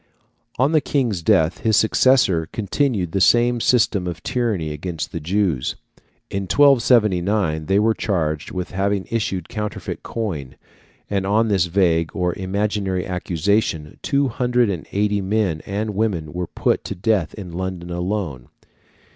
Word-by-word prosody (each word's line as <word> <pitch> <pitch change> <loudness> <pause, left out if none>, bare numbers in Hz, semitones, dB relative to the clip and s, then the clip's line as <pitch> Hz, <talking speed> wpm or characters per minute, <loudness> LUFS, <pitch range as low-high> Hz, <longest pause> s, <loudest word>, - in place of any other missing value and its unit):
On 135 +4 +3
the 155 -2 +3
King's 125 - 0
death 80 +1 +2
his 110 -3 +2
successor 110 -8 +3
continued 105 - -1
the 95 - 0
same 120 +3 +4
system 105 -7 +2
of 85 -2 -6
tyranny 110 - -1
against 80 +1 -5
the 85 - -4
Jews. 85 -5 0 0.6
In 100 0 -2
1279 105 - +3
they 95 - +3
were 110 +2 +3
charged 80 -8 -2
with 90 -1 -5
having 100 0 -1
issued 95 -6 -2
counterfeit 105 -1 -5
coin, 85 - -4 0.5
and 95 -1 -1
on 110 +3 +2
this 95 -4 +2
vague 85 -3 +1
or 90 -2 0
imaginary 100 -1 -2
accusation 90 -3 -1
two 140 0 +1
hundred 125 -2 +1
and 85 -7 -5
eighty 105 0 +1
men 95 -5 0
and 105 +2 -2
women 95 -8 -1
were 90 0 -3
put - - 0
to - - -4
death 95 -3 0
in 95 -5 -8
London 90 0 -5
alone. 90 - -3
95 Hz, 145 wpm, -21 LUFS, 85-110 Hz, 0.6 s, same